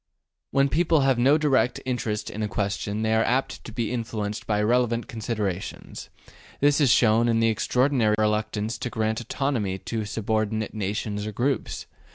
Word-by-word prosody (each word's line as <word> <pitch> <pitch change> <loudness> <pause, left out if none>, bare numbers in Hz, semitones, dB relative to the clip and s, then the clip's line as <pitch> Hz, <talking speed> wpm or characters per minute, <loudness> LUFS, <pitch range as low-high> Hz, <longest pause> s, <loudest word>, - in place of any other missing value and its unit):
When 140 0 +3
people 160 +1 +2
have 135 -3 +2
no 135 +5 +5
direct 135 -5 +2
interest 115 -4 -2
in 110 - -5
a 105 - 0
question 100 +1 -2
they 110 - +1
are 110 - +3
very - - +1
apt 135 - -3
to - - -7
be 115 -1 -2
influenced 110 -3 -4
by 105 -1 +1
irrelevant 120 +1 +1
considerations; 110 -6 -4 0.5
this 145 +1 +3
is 140 - +4
shown 115 0 +4
in 115 -1 +2
the 115 0 +3
extraordinary 125 0 +2
reluctance 110 +1 -1
to 125 - -3
grant 110 0 -1
autonomy 115 -7 -1
to 110 +2 -4
subordinate 110 0 -1
nations 105 0 -3
or - - -3
groups. 130 +6 -2
110 Hz, 170 wpm, -25 LUFS, 105-125 Hz, 0.5 s, no